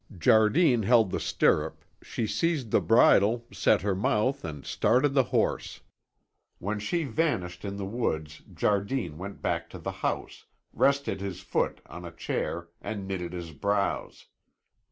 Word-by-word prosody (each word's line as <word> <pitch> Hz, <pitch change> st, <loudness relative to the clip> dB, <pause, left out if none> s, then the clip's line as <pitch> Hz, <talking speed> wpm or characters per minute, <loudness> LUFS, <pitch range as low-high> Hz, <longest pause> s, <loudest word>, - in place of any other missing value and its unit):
Jardine 120 Hz, -, +4 dB
held 110 Hz, -2 st, +4 dB
the -, -, -1 dB
stirrup, 75 Hz, +1 st, +1 dB, 0.2 s
she 115 Hz, -, -3 dB
seized 125 Hz, +3 st, -1 dB
the -, -, +4 dB
bridle, 115 Hz, 0 st, +4 dB
set -, -, +2 dB
her 100 Hz, -1 st, +1 dB
mouth 110 Hz, +8 st, 0 dB
and 75 Hz, -4 st, -7 dB
started 130 Hz, +4 st, +2 dB
the 135 Hz, -3 st, +4 dB
horse. -, -, -1 dB, 0.8 s
When 105 Hz, +3 st, -3 dB
she 165 Hz, +11 st, -1 dB
vanished 110 Hz, -, -1 dB
in 100 Hz, -1 st, -4 dB
the 100 Hz, -, -4 dB
woods 80 Hz, -9 st, -3 dB
Jardine 100 Hz, -, -1 dB
went 100 Hz, +2 st, -8 dB
back -, -, -1 dB
to -, -, -9 dB
the -, -, -4 dB
house, -, -, -3 dB, 0.3 s
rested 140 Hz, -7 st, +1 dB
his 95 Hz, -2 st, -5 dB
foot 95 Hz, -, -1 dB
on 90 Hz, -, -10 dB
a 85 Hz, -, -7 dB
chair, 85 Hz, +1 st, -3 dB
and 100 Hz, -2 st, -5 dB
knitted 90 Hz, -3 st, -4 dB
his 85 Hz, -2 st, -6 dB
brows. 100 Hz, +7 st, -2 dB
100 Hz, 150 wpm, -28 LUFS, 90-120 Hz, 0.8 s, Jardine